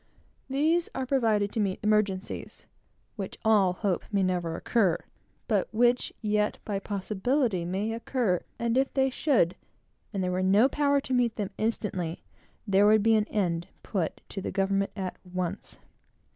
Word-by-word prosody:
These 315 +5 +2
are 265 - -1
provided 225 -6 +2
to - - -3
meet 195 -3 0
exigencies, 210 -3 -1 0.5
which 195 -2 -5
all 205 -4 +5
hope 185 -1 -1
may 200 -2 +2
never 175 -3 -1
occur, 195 -8 +2 0.5
but 210 -5 +1
which 240 +2 +2
yet 210 0 +1
by 200 -2 -2
possibility 205 - -1
may 195 +5 -2
occur, 230 -5 0 0.2
and 235 +2 +1
if 270 - +1
they 265 -1 +3
should, 245 - +2 0.6
and 195 -3 -2
there 180 - 0
were 180 +1 0
no 200 +6 +5
power 285 0 +2
to 260 - -4
meet 245 -2 +2
them 205 -2 -3
instantly, 190 -6 -2 0.4
there 200 0 +4
would 215 -1 +5
be 225 0 +4
an 215 -1 +3
end 175 -5 -1 0.2
put 185 -6 -2
to 195 - -5
the - - -3
government 195 0 +1
at 190 -3 -4
once. 180 -1 -4
210 Hz, 160 wpm, -28 LUFS, 190-235 Hz, 0.6 s, all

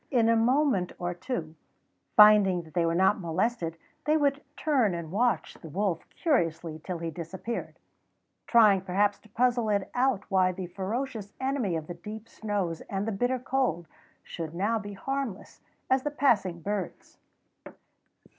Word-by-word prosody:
In 235 -4 +3
a 230 - +5
moment 240 -5 +2
or 175 0 -2
two, 175 -4 -4 0.6
finding 210 -5 +7
that 160 - -16
they 170 -2 +2
were 165 - +1
not 190 +3 +3
molested, 170 0 -1 0.3
they 305 +1 +3
would 280 -1 +1 0.2
turn 255 - +2
and 165 -2 -6
watch 220 -2 +1
the 160 - -9
wolf 185 0 -2
curiously 165 - 0
till 180 -2 -4
he 165 0 -4
disappeared, 180 +8 -6 0.7
trying 215 -5 +6
perhaps 200 +2 +1
to 215 - -21
puzzle 240 0 +1
it 200 -2 0
out 250 -5 +1
why 185 -2 +3
the 185 0 -5
ferocious 205 +4 -4
enemy 260 -9 0
of 160 -1 -3
the 175 - -6
deep 210 +6 -9
snows 200 -8 -3
and 195 +2 -2
the - - 0
bitter 245 +5 0
cold 250 - -1 0.4
should 165 -1 -6
now 215 +5 +1
be 205 -1 -7
harmless 270 0 -4 0.3
as 260 0 +3
the 295 - -1
passing 230 -12 +1
birds. 200 0 -5
205 Hz, 155 wpm, -28 LUFS, 175-245 Hz, 0.7 s, finding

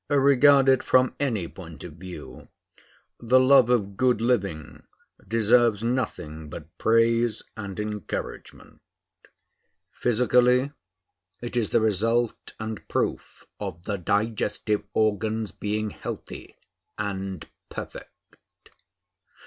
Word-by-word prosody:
Regarded 140 -1 +5
from 130 0 +3
any 115 -11 0
point 80 -4 -11
of 85 - -8
view, 90 +2 -10 0.7
the 125 +2 +4
love 130 -2 +6
of 100 -5 +1
good 125 -3 +3
living 100 -10 -1 0.5
deserves 115 0 +3
nothing 80 -11 -3
but 80 +3 -10
praise 115 0 +2
and 100 -2 -6
encouragement. 105 -3 -6 1.1
Physically, 125 +3 +3 0.7
it 120 0 -6
is 115 -4 +1
the - - +3
result 115 +3 0
and 110 -1 -6
proof - - -3
of 85 - -6
the 100 0 -3
digestive 105 +2 0
organs 110 0 0
being 105 0 -3
healthy - - -8 0.4
and 95 -3 -4 0.2
perfect. - - -8
110 Hz, 100 wpm, -25 LUFS, 100-125 Hz, 1.1 s, love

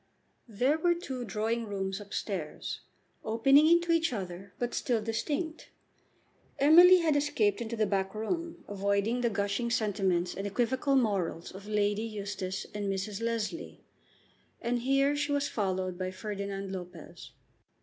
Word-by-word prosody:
There 250 +8 +1
were 345 +1 +3
two 270 -8 -5
drawing 220 +3 -1
rooms 195 0 -3
up 205 0 -12
stairs, 180 -8 -4 0.4
opening 270 +7 +5
into 340 +1 +4
each 330 -2 +2
other, 190 -3 -6
but 245 0 -2
still 240 -3 0
distinct. 290 +9 -3 0.9
Emily 350 +5 +8
had 315 -3 +2
escaped 240 -8 +1
into 230 0 -3
the 215 -1 +2
back 195 0 -1
room, 335 +10 -3
avoiding 200 +4 0
the 240 - +2
gushing 205 +3 -1
sentiments 190 -6 0
and 195 +1 -4
equivocal 255 +6 +1
morals 195 -9 0
of 195 +2 -10
Lady 210 0 +1
Eustace 200 -4 -4
and 205 -1 -2
Mrs. 195 +2 -3
Leslie, 230 +6 -3 0.8
and 240 +1 -1
here 275 +3 +2
she 290 0 -1
was 285 0 +1
followed 185 -3 -2
by 185 0 -2
Ferdinand 200 0 -5
Lopez. 180 -2 -9
215 Hz, 140 wpm, -30 LUFS, 195-270 Hz, 0.9 s, Emily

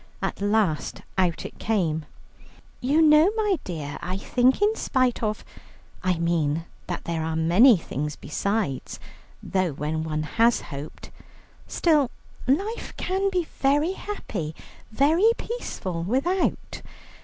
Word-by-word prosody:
At - - -3
last 205 -6 0
out 180 -3 0
it - - -9
came: 165 -8 0 0.7
"You 290 +6 +3
know, 305 +3 +7
my 420 -6 +1
dear, 150 -5 -5
I 180 +2 -3
think 250 +5 +2
in 420 +2 +3
spite 255 - +1
of 215 -1 -2 0.6
I 185 -2 +1
mean 165 -2 0 0.2
that 175 - -4
there 165 -1 -2
are 160 0 -2
many 185 +9 +6
things 150 -2 -4
besides 200 - -2 0.4
though 185 -5 0
when 155 +3 -2
one 155 -1 -2
has 230 +9 +3
hoped 145 0 -9 0.6
still 300 -7 +2 0.4
life 395 - -1
can 385 +2 0
be 365 -2 0 0.2
very 290 +6 +2
happy, 195 - -5 0.4
very 320 - +4
peaceful, 190 - -4
without. 275 - -1
210 Hz, 125 wpm, -25 LUFS, -, 0.7 s, know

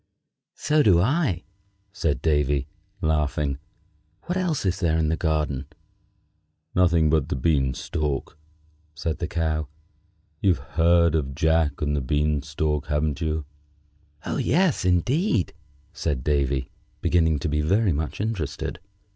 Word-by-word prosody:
"So 150 0 +2
do 95 -10 +5
I," 115 - +1 0.5
said 75 -9 -1
Davy, 75 -3 +2 0.4
laughing. 75 -2 0 0.6
"What 180 - -3
else 180 - -1
is 95 0 0
there 80 -3 +2
in 80 -1 +1
the 80 - +1
garden?" 75 -4 -1 1.1
"Nothing 85 -4 +3
but 80 -3 +1
the - - -1
bean 65 -1 +1
stalk," 75 -4 -3 0.6
said 80 +1 -3
the 85 - -2
Cow. 80 -3 -1 0.7
"You've 95 -5 +3
heard 85 +1 +3
of 70 -4 -1
'Jack 80 -1 +1
and 75 0 0
the 70 - 0
Bean 75 +2 +1
stalk,' 75 0 -2
haven't 75 0 -1
you?" 80 -1 -1 0.8
"Oh! - - -2
yes, 170 - +2
indeed!" 115 - +1 0.4
said 70 -7 -2
Davy, 70 -2 0 0.3
beginning 80 -3 +3
to 85 - -3
be 75 0 0
very 95 +5 +2
much 75 +1 -3
interested. 90 - -3
80 Hz, 130 wpm, -25 LUFS, 75-90 Hz, 1.1 s, do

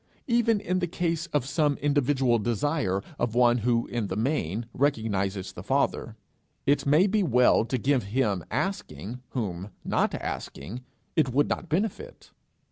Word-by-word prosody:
Even 235 -4 +3
in 185 -1 -1
the 175 - 0
case 170 0 -1
of 150 -6 0
some 145 0 +1
individual 135 -4 +2
desire 115 - 0 0.2
of 120 -1 -1
one 120 0 +4
who 115 +1 +1
in 120 -4 -3
the - - -3
main 110 - -1
recognizes 105 -8 0
the - - -8
Father, - - 0 0.5
it 140 +1 +2
may 150 +7 +5
be 210 +1 +2
well 125 - +4
to 130 - -1
give 130 -1 +1
him 105 -4 0
asking 120 - -3
whom, 100 -5 -4 0.2
not - - +1
asking, 100 - -5 0.3
it 155 -5 +3
would 140 +4 +2
not 175 - -3
benefit. 215 - -3
130 Hz, 150 wpm, -27 LUFS, 110-155 Hz, 0.5 s, may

